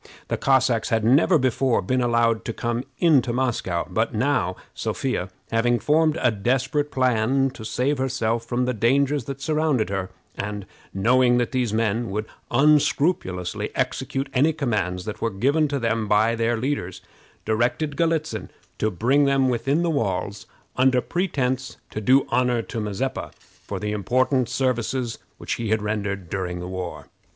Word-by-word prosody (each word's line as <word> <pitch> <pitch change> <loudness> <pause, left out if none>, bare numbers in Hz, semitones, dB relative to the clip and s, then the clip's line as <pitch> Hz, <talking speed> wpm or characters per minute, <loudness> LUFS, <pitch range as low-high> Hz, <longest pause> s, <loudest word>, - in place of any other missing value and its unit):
The - - 0
Cossacks 130 -4 +2
had 110 -1 +1
never 140 - +5
before 130 -2 +1
been 130 +7 0
allowed 115 -2 +2
to 115 - -3
come 120 +2 -2
into 140 -7 +3
Moscow; 120 -9 -1
but 110 +8 -1
now, 110 -7 +1 0.2
Sophia 125 -8 -2 0.2
having 120 +1 +2
formed 155 +3 +2
a 125 - +4
desperate 135 +7 0
plan 130 +1 +2
to 115 - -10
save 130 +5 -1
herself 120 -3 0
from 120 +2 -1
the 125 - 0
dangers 135 +4 +2
that 140 0 -6
surrounded 150 -7 +1
her, 95 -1 -2 0.3
and 105 -1 -4 0.3
knowing 120 +5 +3
that 120 -1 0
these 125 -4 0
men 115 +1 0
would 105 +2 -2 0.2
unscrupulously 140 - +2
execute 135 +1 -2
any 145 +5 +3
commands 105 - -2
that 110 - -6
were 115 - +1
given 140 +10 +1
to 140 0 -2
them 115 -3 -1
by 110 +3 +3
their 115 0 0
leaders, 115 -8 -3 0.4
directed 120 +7 0
Galitzin 165 -1 -1 0.3
to 110 - +1
bring 125 +10 +2
them 135 -1 +3
within 135 +7 +1
the 170 - +1
walls, 100 -6 -2 0.3
under 130 0 +4
pretense 135 -6 -2
to 110 - -4
do 130 +5 +4
honor 125 -2 +1
to 115 - -5
Mazeppa 105 +5 -3
for - - -9
the 105 0 -3
important 125 +4 +1
services 125 -2 -1 0.2
which - - -3
he 115 - -2
had 110 -1 +1
rendered 100 -3 -3
during 90 -1 -3
the 90 - -6
war. 90 -1 -5
120 Hz, 160 wpm, -23 LUFS, 110-135 Hz, 0.4 s, never